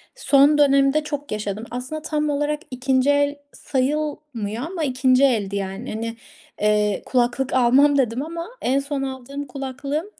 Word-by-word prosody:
Son 290 - +4
dönemde 275 +1 +4
çok 290 -1 -5
yaşadım. 210 +1 -3
Aslında 255 +6 -5
tam 300 -1 -1
olarak 295 +1 0
2'nci 260 +1 +1
el 285 0 +2 0.2
sayılmıyor 265 -5 -2
ama 340 -2 -4
2'nci 255 -1 +3
eldi 210 -7 +2
yani. 195 +5 -4
Hani, 230 +1 -4 0.5
ııı, 210 -1 +2
kulaklık 250 +1 0
almam 260 +3 +4
dedim 245 -2 +1
ama 335 +1 -6
en 265 +2 +2
son 280 0 -3
aldığım 270 +2 -6
kulaklığım, 275 +4 -4
270 Hz, 140 wpm, -22 LUFS, 245-290 Hz, 0.5 s, Son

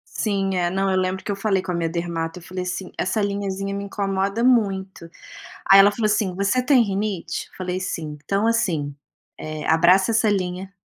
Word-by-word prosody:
Sim 195 -3 0
é, 175 -1 +1
não, 195 +1 0
eu 185 - +1
lembro 185 0 -1
que - - -3
eu - - -1
falei 195 -1 0
com 185 - -4
a - - -1
minha 165 -1 -1
dermato, 170 0 -3
eu - - -16
falei 185 +1 -5
assim: 180 +1 -5
"Essa 185 +4 -1
linhazinha 200 -1 -2
me 200 0 -4
incomoda 200 +2 -1
muito". 195 -8 +1 0.6
Aí 195 - +10
ela 200 +1 +8
falou 215 0 -1
assim: 210 -3 +1
"Você 200 +7 +1
tem 260 -3 +5
rinite?". 195 -4 -3
Eu - - -18
falei: 185 0 -3
"Sim", 160 -5 -4
"Então 200 +2 0
assim, 180 -12 0 0.4
eh, 155 -1 -6
abraça 180 +6 +4
essa 220 -1 +3
linha". 190 -1 -2
190 Hz, 200 wpm, -22 LUFS, 180-200 Hz, 0.6 s, Aí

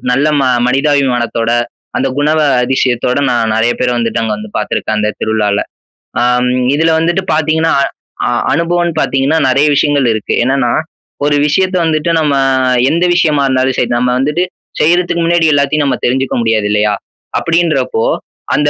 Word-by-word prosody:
நல்ல 140 +4 +1
ம - - +1 0.2
மனிதாபிமானத்தோட 125 -4 0 0.5
அந்த - - 0
குணா 150 +2 +1 0.3
அதிசயத்தோட 125 0 0
நான் 115 -2 0
நெறைய 115 +2 +2
பேர 125 - +1
வந்துட்டு 115 -1 -1
அங்க 110 -1 -1
வந்து 105 0 -8
பார்த்துருக்கேன் 110 - -2
அந்த 105 0 0
திருவிழால. 105 -2 0 0.6
அ - - +1 0.2
ம் 125 0 0
இதுல 160 +2 +2
வந்துட்டு 175 +3 0
பாத்தீங்கன்னா 160 +1 +1 0.5
அ - - +1 0.2
அனுபவம்னு 170 0 0
பாத்தீங்கன்னா 135 +4 +1
நெறைய 140 +4 +3
விஷயங்கள் 145 -2 +2
இருக்கு. 110 -1 -3
என்னன்னா 130 -2 +1 0.5
ஒரு 145 0 +2
விஷயத்த 185 +5 0
வந்துட்டு 155 +1 0
நம்ம 150 -3 +1 0.6
எந்த 170 +3 0
விஷயமா 150 -5 +2
இருந்தாலும் 130 0 0
சரி, 120 - 0
நம்ம 125 +1 0
வந்துட்டு 150 +7 0 0.4
செய்றதுக்கு 170 +1 +1
முன்னாடி 170 -1 +2
எல்லாத்தையும் 145 +1 +1
நம்ம 130 -3 0
தெரிஞ்சுக்க 130 +2 0
முடியாது 110 -2 +1
இல்லையா? 105 0 +1 0.5
அப்படின்றப்போ 155 -9 0 0.5
அந்த 150 0 +2
140 Hz, 150 wpm, -13 LUFS, 120-160 Hz, 0.6 s, நெறைய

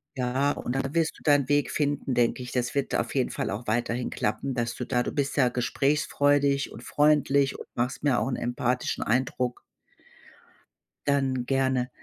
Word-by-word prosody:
Ja, 130 +2 +1
und 125 -3 -4
da 135 - +1
wirst 165 -1 0
du - - -19
deinen 145 -2 +3
Weg 145 0 +2
finden, 145 -3 -1
denke 120 +1 +1
ich. 125 - -8
Das 125 0 -1
wird 140 - -1
auf - - -1
jeden - - +1
Fall - - -3
auch 110 +4 -4
weiterhin 120 +2 -1
klappen, 125 +6 -2
dass 120 -1 -2
du 125 - -4
da 125 -2 +1
du - - -2
bist 140 -1 -1
ja 130 -4 +4
gesprächsfreudig 140 +2 +1
und 115 - -10
freundlich 140 -2 +2
und - - -9
machst 125 +4 -2
mir 140 -4 +3
auch - - -1
'n 125 - -1
empathischen 120 +1 -1
Eindruck. 125 +1 -1 1.4
Dann 135 -3 +1
gerne. 130 -1 +1
130 Hz, 180 wpm, -27 LUFS, 125-140 Hz, 1.4 s, ja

